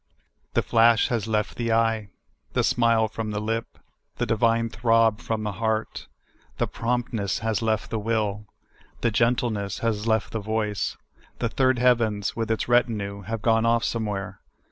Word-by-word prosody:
The - - +3
flash 115 -1 +4
has 115 -3 -1
left 105 -1 -1
the 115 -1 -1
eye; 115 -2 +1 0.4
the - - +2
smile 115 -2 +3
from 110 0 -5
the 105 0 -2
lip; 115 +2 -3 0.4
the 120 - -1
divine 115 +1 +2
throb 115 -1 +2
from 110 -2 -3
the 105 - -2
heart; 110 +2 -2 0.5
the - - +1
promptness 115 -4 -2
has 110 -1 0
left 110 -1 -1
the 110 - -1
will; 105 -1 -1 0.5
the 115 - +2
gentleness 115 -3 0
has 110 -1 -1
left 110 -2 +1
the 110 - -2
voice; 105 -1 -2 0.4
the 115 - -1
third 130 +2 +2
heavens, 115 -4 +2
with 115 -1 -2
its 115 - -1
retinue, 110 -5 +1
have 110 0 -4
gone 115 -1 +3
off 115 0 +2
somewhere. 105 -4 -3
115 Hz, 160 wpm, -25 LUFS, 105-115 Hz, 0.5 s, flash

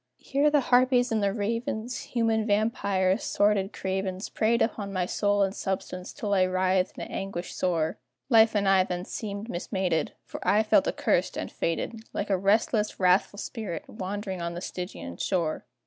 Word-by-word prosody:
Here 280 +2 +1
the 295 -1 +3
harpies 250 0 +3
and 220 -1 +1
the 200 -1 +2
ravens, 230 +3 -2 0.2
Human 225 -2 +2
vampyres, 200 -2 +1
sordid 205 -1 +2
cravens, 190 0 -3
Preyed 230 +2 +1
upon 205 -3 -3
my 185 -2 0
soul 205 +2 +1
and 195 0 0
substance 185 -2 -4
till 205 -2 -3
I 190 - +4
writhed 185 0 +1
in - - -4
anguish 195 -2 -5
sore; 165 -3 0 0.3
Life 225 -3 +5
and 200 -1 +2
I 190 -1 +5
then 180 -1 -4
seemed 205 0 -5
mismated, 180 -3 -1
For - - -7
I 215 +2 +3
felt 215 - +3
accursed - - 0
and - - -4
fated, 220 +7 -2
Like 200 - -2
a - - +4
restless, 210 +2 +1
wrathful 185 +2 +3
spirit, 200 -7 -5
wandering 195 -1 -5
on 170 0 -3
the 175 - -5
Stygian 180 - -6
shore. 170 -5 -1
200 Hz, 165 wpm, -27 LUFS, 185-220 Hz, 0.3 s, Life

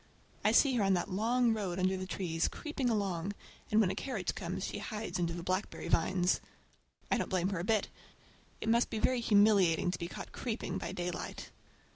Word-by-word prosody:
I - - +4
see 265 -4 +5
her 215 - +2
on 195 -1 +4
that 180 +3 -2
long 230 +4 +2
road 195 -5 -2
under 185 +1 +2
the 185 0 -4
trees, 170 -3 -1
creeping 285 -5 -2
along, 200 -4 -1 0.4
and 215 - +4
when 195 -4 +4
a - - -4
carriage 265 +5 -2
comes - - -4
she - - -4
hides 210 -5 -4
under 170 -1 0
the 170 0 -5
blackberry 185 -1 -2
vines. 180 +2 +2 0.7
I - - +3
don't - - -2
blame 185 0 +1
her 190 -4 -2
a - - -2
bit. 215 +1 +2 0.7
It - - -4
must 235 +1 +3
be 225 - -3
very 250 +3 +2
humiliating 200 -6 +4
to 175 - -4
be 170 - -3
caught - - -8
creeping 235 -2 -3
by 170 - -4
daylight! 180 -1 -5
190 Hz, 200 wpm, -33 LUFS, 180-220 Hz, 0.7 s, see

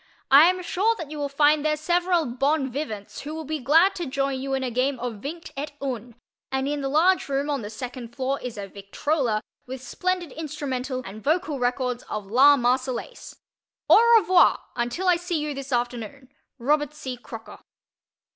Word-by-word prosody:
I 280 +4 +9
am 365 +1 +2
sure 405 +6 +1
that 325 -8 -8
you 305 - -6
will 285 -1 -2
find 290 +1 +3
there 305 0 +1
several 345 +1 +1
bon 270 +2 0
vivants 220 -7 -5
who 300 +2 -6
will 320 - -5
be 310 +1 -3
glad 325 +9 +4
to 345 -4 -3
join 275 0 -1
you 270 0 -1
in 265 - -2
a 250 - -2
game 255 +2 0
of 235 -4 -5
vingt 330 +5 -7
et 290 +2 -5
un, 245 -4 -5 0.4
and 265 0 -1
in 290 0 -2
the 270 - -2
large 335 +4 +3
room 280 +2 0
on 280 -3 -1
the 205 - -6
second 240 +1 -7
floor 270 +1 -1
is 245 -3 -6
a 200 -1 -5
victrola 215 +4 -1 0.2
with 260 +1 -6
splendid 360 +2 -2
instrumental 270 -4 -4
and 210 +3 -9
vocal 310 -1 0
records 250 0 -1
of 210 - -4
"La 270 +8 +6
Marseillaise." 255 - -2 0.6
Au 470 +1 +7
revoir 370 -3 +5 0.2
until 240 +11 -2
I 355 -1 +5
see 350 -1 -2
you 300 -1 -2
this 275 0 -7
afternoon. 245 +1 -3 0.3
Robert 295 +3 0
C. 260 -4 -5
Crocker. 225 -1 -10
275 Hz, 185 wpm, -25 LUFS, 250-310 Hz, 0.6 s, I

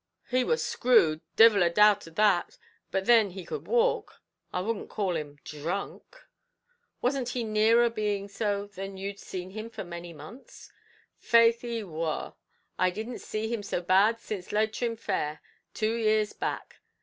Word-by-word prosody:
"He 255 0 +3
war 475 - +1
screwed; 165 - +3
divil 220 -3 +7
a 175 - +4
doubt 210 +1 +4
of 165 - -14
that; 205 -4 +2 0.3
but 190 0 -1
thin, 230 -4 +5
he 185 -1 -9
could - - -6
walk 485 +1 +1 0.3
I - - -2
wouldn't 210 +3 -3
call 190 -4 -1
him 145 -2 -5
dhrunk." 180 - -6 0.8
"Wasn't 255 -1 0
he 245 -1 -2
nearer 225 +2 +4
being 210 -3 -2
so 200 0 -2
than 195 -1 -8
you'd 200 +1 -5
seen 185 0 -7
him 215 +3 -6
for 230 - -7
many 170 -1 -8
months?" 165 - -13 0.5
"Faix, 230 0 +4
he 235 -2 -4
war. 160 -4 -4 0.5
I 185 - +4
didn't 220 +6 -6
see 215 +1 -4
him 230 - -2
so 200 -3 -2
bad 195 +6 +3
since 200 -5 -6
Leitrim 220 +2 0
fair, 150 -8 -3 0.4
two 215 +1 0
years 215 -2 +1
back." - - -4
210 Hz, 160 wpm, -28 LUFS, 185-230 Hz, 0.8 s, divil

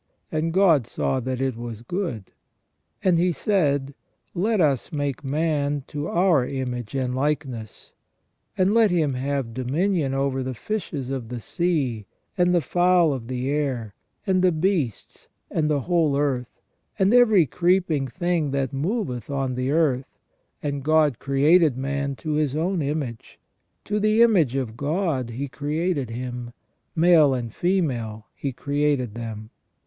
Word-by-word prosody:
And 155 +1 0
God 165 - +4
saw 130 - -1
that 130 0 -3
it 135 -2 -1
was 115 -1 -7
good. 125 - -4 0.7
And 180 -3 +3
He 180 +1 +3
said: 145 -8 0 0.4
Let 210 +4 +1
us 140 -7 +1
make 145 -3 -2
man 145 -1 0
to 145 +1 -4
our 170 -6 +3
image 125 -3 -4
and 130 -2 -1
likeness; 130 -5 -3 0.6
and 190 +2 +3
let 225 -2 +5
him 160 -6 +1
have 135 -2 -2
dominion 140 - 0
over 135 -1 0
the 130 0 -4
fishes 145 - -4
of 125 -4 -4
the 125 -1 -5
sea, 135 - -1 0.3
and 180 -2 +3
the 175 -1 +3
fowls 175 -2 +3
of 120 -4 -6
the 130 +2 -2
air, 130 -8 -2 0.3
and 190 -2 +2
the 185 -1 +4
beasts, 160 - -2 0.2
and 155 -1 +1
the 145 -2 +1
whole 160 -3 +1
earth, 130 -4 -2 0.3
and 195 +2 +3
every 220 -8 +6
creeping 170 -4 +1
thing 175 +1 -1
that 135 -1 -1
moveth 150 - -2
on 135 -2 -1
the 125 +1 -2
earth. 140 -4 0 0.5
And 145 -1 -2
God 155 -4 +3
created 145 +1 +3
man 140 +1 -2
to 155 - -5
His 150 -2 0
own 175 +3 0
image; 140 -5 -4 0.5
to 210 +1 -1
the 215 +2 +4
image 175 - +3
of 125 -5 -2
God 145 -2 -1
He 130 +5 -4
created 150 0 -2
him: 120 0 -6 0.4
male 160 -5 +5
and 120 -3 -4
female 125 - -1
He 140 - -4
created 140 -3 -1
them. 110 -1 -7
145 Hz, 150 wpm, -24 LUFS, 130-170 Hz, 0.7 s, every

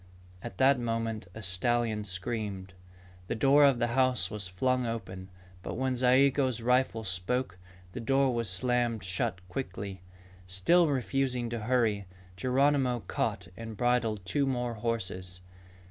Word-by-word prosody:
At 120 - -8
that 135 0 +4
moment, 115 -3 -2
a 110 - -7
stallion 110 +3 0
screamed. 95 -1 -4 0.5
The - - -2
door 140 +5 +5
of 135 -3 +4
the 120 0 0
house 130 -1 +2
was 105 -3 -4
flung 125 +7 0
open. 95 -5 -6 0.3
But - - -5
when 130 +1 0
Zayigo's 130 0 +3
rifle 125 -1 +1
spoke, 95 +1 -2 0.3
the 125 - -6
door 135 +2 +2
was 115 -2 -1
slammed 120 +3 +1
shut 90 -1 -2
quickly. 95 -3 -5 0.5
Still 160 - +3
refusing 130 -3 -1
to 120 - -2
hurry, 110 -4 +1 0.3
Geronimo 130 +1 +2
caught - - -3
and 115 -1 -8
bridled 115 -5 +1
two 135 +10 0
more 125 -2 -1
horses. 95 -5 -3
115 Hz, 135 wpm, -30 LUFS, 100-130 Hz, 0.5 s, door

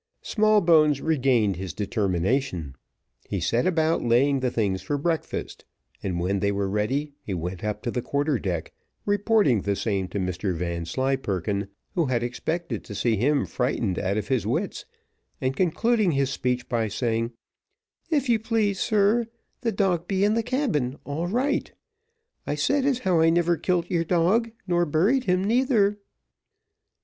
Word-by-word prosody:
Smallbones 170 - +4
regained 125 - +2
his 95 -1 -6
determination. 100 - -1 0.6
He - - -1
set 120 +6 +1
about 165 -2 +2
laying 135 +4 +3
the 130 -1 0
things 100 -6 -1
for 145 - -2
breakfast, 160 +2 -3 0.4
and 90 -3 -2
when 95 +3 0
they 100 +1 +1
were 100 -1 -1
ready 130 +9 -1
he 95 - -4
went 90 +1 -5
up 105 0 -3
to 120 - -2
the 125 - -2
quarter 145 0 0
deck, 85 -5 -3 0.3
reporting 205 - +3
the 100 +1 -1
same 100 -3 -1
to 100 - -5
Mr 90 0 -2
Vanslyperken, 95 +3 -2 0.3
who 170 -6 +1
had 120 -2 0
expected 125 - -3
to 100 - -8
see 110 +3 +1
him 140 +7 +2
frightened 120 -7 -1
out 100 +1 -1
of 105 -1 -2
his 130 -4 0
wits, - - -2 0.5
and 130 +1 -1
concluding 200 - +2
his 135 -1 +1
speech 125 -1 -1
by 115 -2 0
saying, 115 +2 -1 0.8
"If 290 -5 +1
you 235 -2 +3
please, 215 -3 0
sir, 215 +2 +2 0.3
the 235 -2 0
dog 185 -4 0
be 195 -1 +1
in 210 +1 +3
the 230 - +2
cabin, 220 - -1
all 155 +4 -3
right; 265 +9 0 0.8
I - - 0
said 280 -1 +1
as 270 -3 +2
how 185 -9 +1
I 165 0 +5
never 170 +1 +3
kilt 175 +1 -1
your 170 -2 +2
dog, 180 +8 +2 0.2
nor 175 -2 +1
buried 205 - +2
him 180 +1 +2
neither." 215 -2 +2
140 Hz, 160 wpm, -25 LUFS, -, 0.8 s, I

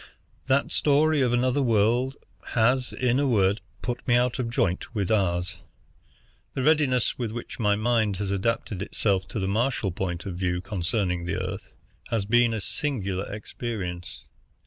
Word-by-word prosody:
That 140 +1 +2
story 150 +1 +3
of 125 -2 +2
another 125 +3 +2
world 120 +3 +2 0.4
has, 125 +3 +3
in 125 0 +1
a 145 - +2
word, 100 -3 +2 0.2
put 120 -1 -4
me 120 - +4
out 125 +1 +2
of 120 -2 -1
joint 100 -1 -1
with 100 -2 0
ours. 90 -4 +1 1.0
The 130 - -1
readiness 140 -6 +2
with 115 -3 -2
which 120 +2 -7
my 105 -3 +3
mind 110 -2 +1
has 100 0 -2
adapted 100 -1 -1
itself 100 -2 0
to 100 - -4
the 95 - -1
Martial 110 -1 0
point 90 -1 -3
of 95 - -4
view 90 -1 -1
concerning 90 -1 -1
the 85 - -2
Earth 95 +1 -5 0.3
has 110 -4 0
been 120 +2 +4
a 110 - -2
singular 105 -5 -2
experience. 100 -4 -5
110 Hz, 160 wpm, -26 LUFS, 95-125 Hz, 1.0 s, me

